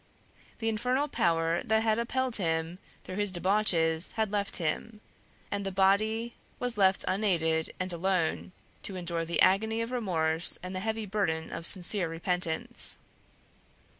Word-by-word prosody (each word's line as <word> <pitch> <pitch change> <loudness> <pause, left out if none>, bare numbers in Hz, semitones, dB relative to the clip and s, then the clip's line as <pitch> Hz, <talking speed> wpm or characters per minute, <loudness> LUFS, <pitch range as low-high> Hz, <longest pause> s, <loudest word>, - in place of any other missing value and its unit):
The 225 - -4
infernal 250 +6 -1
power 165 - 0
that 220 0 +1
had 220 0 +1
upheld 255 +1 -1
him 165 -1 -2 0.2
through 185 - -8
his 205 -2 -1
debauches 175 -3 +2
had 220 -2 -2
left 200 -1 -2
him, 210 +6 -4 0.5
and 200 0 -3
the 195 - -4
body 215 +5 +1 0.3
was 245 -1 -1
left 190 -2 +2
unaided 165 -5 0
and 185 -1 -2
alone 180 0 -1 0.3
to 195 - -5
endure 170 -2 -3
the 170 - -3
agony 220 +4 +2
of 230 +1 -4
remorse 170 -9 +1
and 180 +1 -6
the - - -3
heavy 220 +2 -3
burden 185 -6 -2
of 165 - +1
sincere 185 -1 +4
repentance. 165 0 +3
190 Hz, 145 wpm, -28 LUFS, 170-220 Hz, 0.5 s, sincere